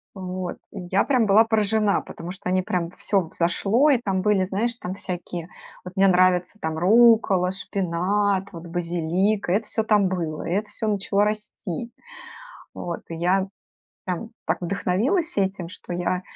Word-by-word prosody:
Вот. 185 -1 -5 0.2
И 180 -3 -7
я 195 +1 +3
прям 250 -6 +2
была 210 +3 +6
поражена, 215 -2 +2
потому 170 +2 -8
что 195 -2 -7
они 185 0 +2
прям 175 -2 -2
всё 195 +1 0
взошло 210 - +2
и 265 - +4
там 195 -5 -1
были 205 -2 +3
знаешь 220 +6 -1
там 185 -4 -5
всякие, 175 -2 -6 0.4
вот 180 +1 -9
мне 195 0 +5
нравятся 185 +2 +3
там 160 0 -2
руккола, 205 -2 +5
шпинат, 195 +2 0
вот 170 0 -9
базилик- 175 +4 0
и - - +2
это 210 +2 +1
всё 220 0 -1
там 205 -3 +3
было, 165 -4 -3
и - - -2
это 210 +2 0
всё 215 +1 -3
начало 205 0 +1
расти. 210 0 -4 0.8
Вот. 170 -1 -5
И 165 - -5
я 185 +3 +1 0.6
прям 185 +5 -4 0.2
так - - +1
вдохновилась 205 - 0
этим, 190 -3 -1
что 180 - -9
я 180 +1 -1
190 Hz, 165 wpm, -24 LUFS, 180-210 Hz, 0.8 s, была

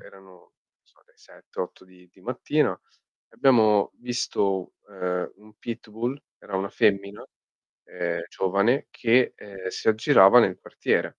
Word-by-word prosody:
erano, 95 -1 -16
non 90 -1 -20 0.3
so, - - -31
le - - -32
7-8 90 +1 -9
di 90 -1 -21
di - - -23
mattina, - - -1 0.5
abbiamo 110 -6 +3
visto, 100 -6 -2
ehm, 90 -2 -3
un 105 0 -19
pitbull, 120 +4 -5 0.2
era 95 - -6
una 95 +1 -2
femmina, 100 -1 0 0.6
ehm, 85 -1 -4
giovane 100 +8 +1
che, 120 +2 +2
ehm, 95 -2 -10
si 95 - -3
aggirava 110 -1 +6
nel 95 -6 +3
quartiere. - - -1
100 Hz, 130 wpm, -25 LUFS, 95-115 Hz, 0.6 s, aggirava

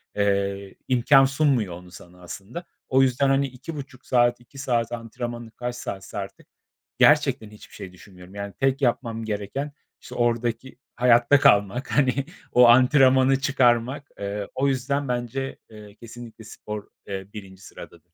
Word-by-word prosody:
eee, 100 -1 -1
imkân 135 +2 +5
sunmuyor 135 - +1
onu 90 0 -12
sana 90 0 -15
aslında. 110 - -8 0.2
O 130 +1 +4
yüzden 135 +1 +2
hani 135 0 +2
2.5 135 0 -10
saat, 120 -1 +2
2 120 +3 -18
saat 120 -4 -1
antrenmanı, 120 0 -6
kaç 120 +1 -5
saatse 100 -3 -7
artık 100 -1 -8 0.5
gerçekten 110 -1 +3
hiçbir 105 - -15
şey 95 -1 -9
düşünmüyorum. 90 +2 -15
Yani, 100 0 -6
tek 135 +1 +1
yapmam 115 -3 -1
gereken 110 +7 -4 0.3
işte - - -11
oradaki 120 +1 -1 0.2
hayatta 120 +3 +4
kalmak, 105 +2 +2
hani 140 -1 +1 0.3
o 125 -1 +6
antrenmanı 130 +1 +5
çıkarmak. 130 0 +1
Eee, 100 0 -4
o 140 +1 +1
yüzden 140 +1 -1
bence, 125 +2 -3
eee, 105 -2 -13
kesinlikle 115 -1 -12
spor, 105 -1 -8 0.2
eee, 95 -1 -6
1. 95 -2 -11
sıradadır. 85 -3 -13
120 Hz, 140 wpm, -24 LUFS, 105-135 Hz, 0.5 s, o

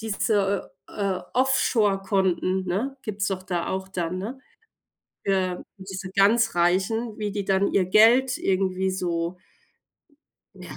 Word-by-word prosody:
diese, 200 -2 0 0.2
äh, 195 -3 -2 0.2
Offshore 230 -6 +2
Konten, 190 -1 0
ne? 240 +10 -2
Gibt's 205 -2 -3
doch 190 -1 -3
da 175 -2 -3
auch 190 0 -3
da, 175 -3 -3
ne? 205 +9 -5 0.9
Für 185 -2 0
diese 190 0 -7
ganz 225 +4 +4
Reichen, 195 +6 +1
wie 210 -2 -3
die 200 -1 -3
dann 195 +1 +2
ihr 190 -2 +3
Geld 235 +7 +5
irgendwie 190 0 0
so 175 -1 -2 1.2
ja, - - -10
195 Hz, 130 wpm, -25 LUFS, 185-215 Hz, 1.2 s, Geld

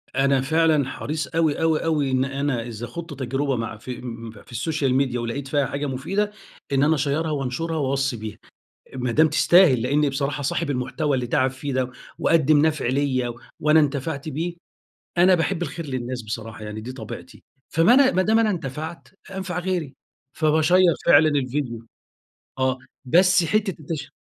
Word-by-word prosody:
أنا 135 0 +3
فعلًا 155 0 +2
حريص 150 +2 -4
أوي، 160 -1 0
أوي، 160 -1 +2
أوي 150 -4 +1
إن 130 0 +2
أنا 135 -2 -1
إذا 120 0 -6
خُضت 165 +6 -7
تجربة 135 +2 -1
مع 115 -1 -4
في 125 +3 -7
م 115 -2 -7
في 110 - -16
السوشيال 135 +2 -1
ميديا 130 -3 +1
ولقيت 120 +4 -4
فيها 145 0 +1
حاجة 140 +2 -3
مفيدة، 190 +11 -1 0.4
إن 135 0 +3
أنا 155 +2 +4
أشيّرها 150 +3 0
وأنشرها 150 +4 -2
وأوصّي 135 -3 0
بيها. 110 0 -7 0.6
ما 125 -1 -1
دام 155 +4 +5
تستاهل، 160 -9 +5
لإنّي 145 +3 +2
بصراحة 140 +1 -2
صاحب 145 +2 -1
المحتوى 140 +3 -1
اللي 125 -2 -1
تعب 130 +1 +2
فيه 135 +1 -5
ده، 130 -1 -1 0.3
وقدّم 155 -2 +4
نَفع 155 -5 -1
ليّا 130 -2 0 0.3
وأنا 155 +1 +5
انتفعت 140 +1 -2
بيه، 165 +4 -3 0.6
أنا 185 +1 +6
باحب 175 +1 0
الخير 165 -2 -5
للناس 125 -2 -4
بصراحة 110 0 -6
يعني 105 +1 -6
دي 125 +4 -7
طبيعتي. 115 -5 -9 0.3
فما 165 +9 +4
أنا 270 -1 +6
ما 185 - +2
دام 220 +3 +3
أنا 225 -2 +3
انتفَعت 160 -1 -5 0.2
أنفع 190 -2 -4
غيري. 175 -7 -2 0.4
فباشيّر 160 +3 +3
فعلًا 155 -1 +7
الفيديو. 130 -5 -2 0.7
آه. 130 0 +1 0.3
بس 180 +5 +5
حتّة 205 +2 0
التش 150 -2 -6
140 Hz, 165 wpm, -23 LUFS, 130-160 Hz, 0.7 s, فعلًا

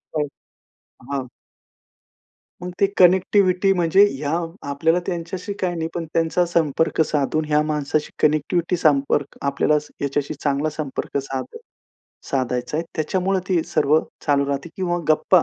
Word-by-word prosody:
काय 150 -1 0 0.9
हां. 135 -2 -2 1.4
मग 180 - -4
ती 200 - +5
कनेक्टिव्हिटी, 185 +1 +4
म्हणजे 175 +2 +3
हे 135 +2 -7 0.5
आपल्याला 160 +5 +2
त्यांच्याशी 180 +3 -4
काही 180 -2 -1
नाही, 160 -1 -2
पण 170 -1 -3
त्यांचा 165 +2 +2
संपर्क 160 -1 +1
साधून 155 +1 0
ह्या 150 0 +3
माणसाशी 150 0 -1
कनेक्टिव्हिटी, 165 +4 +2
संपर्क 145 -3 +1
आपल्याला 140 +2 +1 0.2
ह्याच्याशी 140 +1 -1
चांगला 145 +1 -1
संपर्क 150 -2 -4
साधाय, 135 - -5 0.7
साधयच 125 -1 -1
आहे, 160 - +1
त्याच्यामुळे 185 +4 0
ते 175 -4 +2
सर्व 150 +2 +4 0.3
चालू 140 -1 +3
राहते 140 +4 -3
किंवा 175 -2 -1
गप्पा 160 +3 +4
155 Hz, 130 wpm, -22 LUFS, 140-175 Hz, 1.4 s, ती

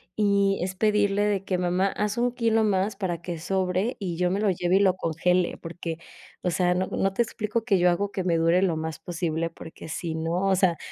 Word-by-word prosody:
y 200 -2 +2
es 185 +1 -3
pedirle 205 0 +2
de 200 -2 0
que: 185 -2 -1
''Mamá, 180 +2 +1
haz 210 +3 -2
un 245 +1 +2
kilo 230 -2 +1
más 200 0 +1
para 175 -4 -3
que 175 -2 -5
sobre 190 +5 -1
y 180 -5 -3
yo 180 0 +1
me 195 - 0
lo 210 - +2
lleve 180 +1 +1
y - - +3
lo 190 -2 +4
congele'', 180 +1 0
porque, 165 -1 -6 0.4
o 180 - 0
sea, 180 0 +2
no 185 +1 0
no 195 0 -1
te 235 - +1
explico 215 0 -3
que 195 -6 +3
yo 180 - +5
hago 200 +3 0
que 190 -2 -3
me 170 -2 +1
dure 165 +2 +3
lo 175 -4 +1
más 160 -1 -4
posible, 165 -1 -2
porque, 160 0 -11
si 165 +1 -3
no, 170 +4 -1
o 195 - +4
sea, 180 -3 +2
185 Hz, 230 wpm, -26 LUFS, 175-200 Hz, 0.4 s, yo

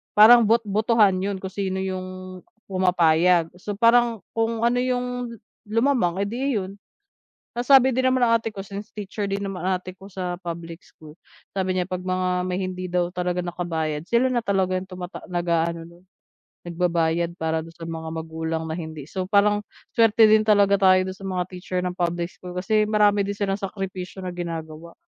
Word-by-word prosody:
parang 225 +1 +8
bot 230 +1 +3
botohan 210 -2 +3
'yon 200 +1 -2
kung 190 - -5
sino 190 -1 -2
'yong, 185 0 -6 0.3
pumapayag. 175 -2 +3
So 205 +1 -5
parang 230 0 +3
kung 225 0 -1
ano 245 +1 +3
'yong, 250 -1 -2 0.3
lumamang 225 -5 +1
eh, - - -1
'di 260 +2 -1
'yon. 195 0 -4 0.8
Nasabi 265 +1 +6
din 260 +1 +1
naman 255 -1 +2
ng 230 -1 +4
ate 225 - -4
ko, 195 - -5
since 200 +3 -9
teacher 205 0 -4
din 200 +1 -2
naman 185 -2 -4
ate 185 0 -2
ko 195 - -12
sa 180 -2 -5
public 170 -1 -7
school, 155 +1 -16 0.3
sabi 190 -1 -1
niya 180 0 -2
'pag 185 0 -4
mga 185 0 0
may 185 +1 -2
hindi 185 0 -4
daw 175 0 0
talaga 180 0 -2
nakabayad 165 -3 -3
sila, 250 +2 +2
na 245 - +1
talaga 190 -2 +1
yung 185 - -7
tumata 180 -1 -8
nag-a-ano 170 0 -2 0.6
nagbabayad 170 -1 0
para 160 0 -1
'don 165 - -13
sa 165 0 -8
mga 160 0 -5
magulang 160 0 -4
na 160 - -3
hindi. 160 -3 -7
So 185 -1 -3
parang 205 +1 +2 0.3
swerte 225 -1 +6
din 215 0 +5
talaga 200 -2 +4
tayo 185 -1 +5
dun 190 - -8
sa 195 - -10
mga 185 -2 -1
teacher 180 0 -4
ng 180 0 -4
public 175 0 -1
school 180 -1 -10
kasi 215 +4 +1
marami 210 -1 +3
din 200 - -2
silang 195 -1 -1
sakripisyo 190 -2 -6
na 185 - -4
ginagawa. 165 -2 -6
185 Hz, 180 wpm, -24 LUFS, 175-210 Hz, 0.8 s, parang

